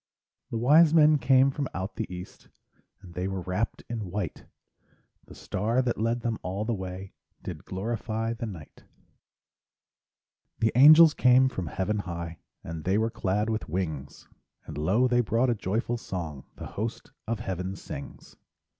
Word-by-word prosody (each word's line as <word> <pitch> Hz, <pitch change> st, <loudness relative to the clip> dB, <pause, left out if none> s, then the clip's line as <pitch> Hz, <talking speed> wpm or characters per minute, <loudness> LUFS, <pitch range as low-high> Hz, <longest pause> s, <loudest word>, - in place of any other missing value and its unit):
The 115 Hz, -, -3 dB
wise 150 Hz, +7 st, +5 dB
men 155 Hz, -1 st, +6 dB
came 130 Hz, +2 st, +4 dB
from 140 Hz, 0 st, -3 dB
out 95 Hz, +3 st, -4 dB
the 110 Hz, -4 st, -4 dB
east, 90 Hz, 0 st, -9 dB, 0.6 s
And 90 Hz, -2 st, -12 dB
they 90 Hz, +2 st, -2 dB
were 95 Hz, -1 st, -3 dB
wrapped 95 Hz, +5 st, -2 dB
in 110 Hz, -5 st, -4 dB
white; 90 Hz, -4 st, -4 dB, 0.8 s
The -, -, -13 dB
star 115 Hz, +7 st, -1 dB
that 120 Hz, -3 st, -1 dB
led 115 Hz, +2 st, 0 dB
them 115 Hz, -1 st, -2 dB
all 95 Hz, +4 st, -3 dB
the 120 Hz, -, 0 dB
way 95 Hz, -1 st, -6 dB, 0.3 s
Did -, -, -7 dB
glorify 110 Hz, +3 st, -3 dB
the 115 Hz, 0 st, -5 dB
night. 85 Hz, -8 st, -10 dB, 1.7 s
The 110 Hz, 0 st, +2 dB
angels 155 Hz, +5 st, +9 dB
came 130 Hz, 0 st, +5 dB
from 95 Hz, -9 st, -5 dB
heaven 100 Hz, +6 st, -1 dB
high, 85 Hz, -3 st, -5 dB, 0.2 s
And 80 Hz, -1 st, -6 dB
they 95 Hz, +4 st, +1 dB
were 110 Hz, +1 st, +1 dB
clad 105 Hz, +2 st, -1 dB
with 110 Hz, -6 st, -3 dB
wings; 80 Hz, -6 st, -4 dB, 0.4 s
And 75 Hz, -, -8 dB
lo, 95 Hz, -, +2 dB
they 120 Hz, -1 st, +3 dB
brought 120 Hz, +2 st, +1 dB
a -, -, +3 dB
joyful 115 Hz, +3 st, -2 dB
song 80 Hz, -, -6 dB
The -, -, -8 dB
host 110 Hz, +3 st, -5 dB, 0.2 s
of 115 Hz, -1 st, -2 dB
heaven 95 Hz, +1 st, -4 dB
sings. 70 Hz, -6 st, -9 dB
105 Hz, 160 wpm, -27 LUFS, 90-120 Hz, 1.7 s, angels